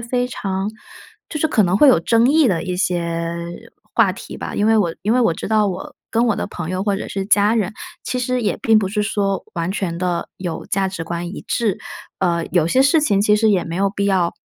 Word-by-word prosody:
非 245 +1 -1
常 195 -4 -3 0.6
就 305 - -4
是 315 - +2
可 225 -8 +3
能 180 0 +2
会 290 - +6
有 250 - +5
争 230 +6 +3
议 310 -4 +5
的 170 -5 0
一 180 -1 -3
些 170 -2 -1 0.6
话 - - +4
题 - - -9
吧， - - -5
因 205 - +1
为 220 0 +4
我 170 -5 +1
因 215 +3 +1
为 250 - +3
我 175 -9 +3
知 - - -6
道 215 0 +2
我 185 -2 -5 0.2
跟 235 +1 +2
我 225 - +2
的 - - -2
朋 170 -1 -6
友 185 +1 -2
或 200 -1 0
者 - - -5
是 195 -1 -3
家 210 +1 +4
人， 210 -5 0 0.3
其 255 - -3
实 250 0 -1
也 210 - 0
并 225 -1 +5
不 200 - 0
是 210 +1 -1
说 200 -2 -1
完 170 0 -2
全 185 -4 -2
的 180 -1 -2
有 175 -3 -4
价 195 0 0
值 185 -3 -5
观 170 +1 -4
一 195 - -7
致， 220 -6 0 0.4
呃， 170 -3 +1
有 175 -3 +3
些 255 +10 +3
事 285 +4 +4
情 205 -10 +2
其 210 0 +4
实 220 +1 +3
也 190 -4 +2
没 165 +1 -5
有 200 +1 +2
必 200 0 -2
要 185 -4 +2
200 Hz, 260 characters per minute, -20 LUFS, 180-225 Hz, 0.6 s, 会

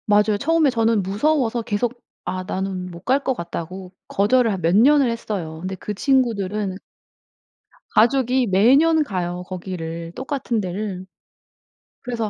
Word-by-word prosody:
맞아요. 210 0 +3
처음에 315 +2 +3
저는 225 -4 +1
무서워서 235 +4 +1
계속 230 +3 -2 0.2
아 185 0 -3
나는 185 -1 -4
못 170 0 -10
갈 270 +2 +2
것 265 - +1
같다고 180 -1 -6 0.2
거절을 225 +4 +2
한 190 -3 -3
몇 170 +2 +2
년을 270 +4 +5
했어요. 195 -9 -4
근데 190 +1 -4
그 210 +3 -5
친구들은 210 -6 0 1.1
가족이 250 +2 +3
매년 275 - +4
가요, 180 -7 -3
거기를. 170 -3 -6
똑같은 260 -4 -2
데를. 190 0 -4 1.0
그래서 230 -3 -3
210 Hz, 285 characters per minute, -22 LUFS, 185-250 Hz, 1.1 s, 년을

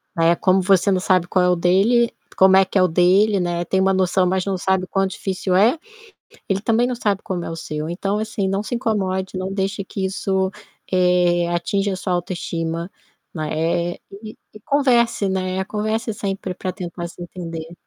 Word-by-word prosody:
né, 165 +1 +4
como 185 0 +3
você 195 +1 +3
não 185 - +1
sabe 185 -2 +2
qual 185 0 +2
é 180 - +3
o 180 - +3
dele 205 +7 +3 0.3
como 190 0 +6
é 190 - +7
que 190 - -2
é - - +5
o 185 - +5
dele, 190 +5 +3
né, 175 0 -2
tem 190 +2 +1
uma 195 0 +3
noção, 185 0 +2
mas 185 +1 0
não 195 -1 -1
sabe 190 0 0
o - - -23
quão 195 0 +1
difícil 190 -1 -3
é, 225 - +4 0.7
ele 195 0 0
também 230 +2 +2
não 250 0 -2
sabe 205 -4 -1
como 180 -2 -3
é - - -5
o 165 - -5
seu, 155 -1 -5
então 195 +4 -2
assim, 215 -2 -2
não 195 +1 0
se 240 +3 -4
incomode, 190 -5 -1
não 185 +1 -3
deixe 195 +1 -2
que 190 0 -4
isso, 190 0 -1 0.4
eh, 180 -1 +3
atinja 195 +3 -1
a - - -2
sua 185 0 -2
autoestima, 170 -1 -3 0.4
ma 155 -3 -4
eh, 170 +2 -1 0.3
e 215 0 -9 0.2
e 215 - -12
converse, 245 -8 +2
né, 190 0 -1
converse 215 +2 -2
sempre 195 -2 -4
para 185 +1 -4
tentar 175 -2 -6
se 170 - -13
entender. 165 -2 -7
190 Hz, 200 wpm, -21 LUFS, 175-200 Hz, 0.7 s, é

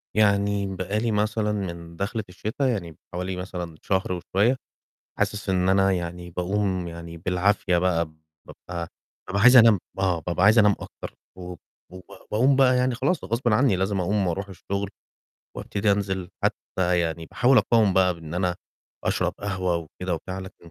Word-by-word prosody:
يعني 100 -2 +2
بقى 100 +4 -2
لي 115 0 0
مثلًا 105 0 0
من 85 -5 -5
دَخلة 105 +4 -3
الشِتا 110 +9 -2
يعني 85 - -3 0.2
حوالي 90 +1 -3
مثلًا 90 -3 -6
شهر 95 -1 -1
وشوية، 100 +7 +1 0.6
حاسس 100 0 -1
إن 90 -1 +2
أنا 95 0 +4
يعني 90 0 -4
باقوم 90 0 -1
يعني 85 0 -8
بالعافية 90 +1 +1
بقى، 85 -2 +2 0.4
بابقى 85 -1 -7 0.4
بابقى 100 +1 0
عايز 125 +1 +8
أنام 115 -4 +8 0.2
آه، 90 -3 +1
بابقى 90 +1 +1
عايز 105 +3 +6
أنام 105 -1 +6
أكتر - - -9 0.2
و 90 0 -7 0.4
وب 90 0 -10 0.3
باقوم 130 +5 +3
بقى 130 -2 +5
يعني 125 0 +1
خلاص 140 +9 0
غصبٍ 120 +2 -1
عنّي 110 -3 +3
لازم 95 +1 0
أقوم 100 +2 0
وأروح 95 +3 -2
الشُغل 100 +1 -4 0.7
وأبتدي 100 0 0
أنزِل، 95 -3 -2
حتّى 90 -1 0
يعني 80 -1 -3
باحاول 125 +9 +4
أقاوم 110 -4 +3
بقى 90 -1 +3
بإن 80 -1 -9
أنا 90 -1 0 0.5
أشرب - - 0
قهوة 95 -3 -1
وكده 85 +2 -4
وبتاع 95 +3 -6
لكن 95 -3 -11
95 Hz, 160 wpm, -25 LUFS, 90-105 Hz, 0.7 s, عايز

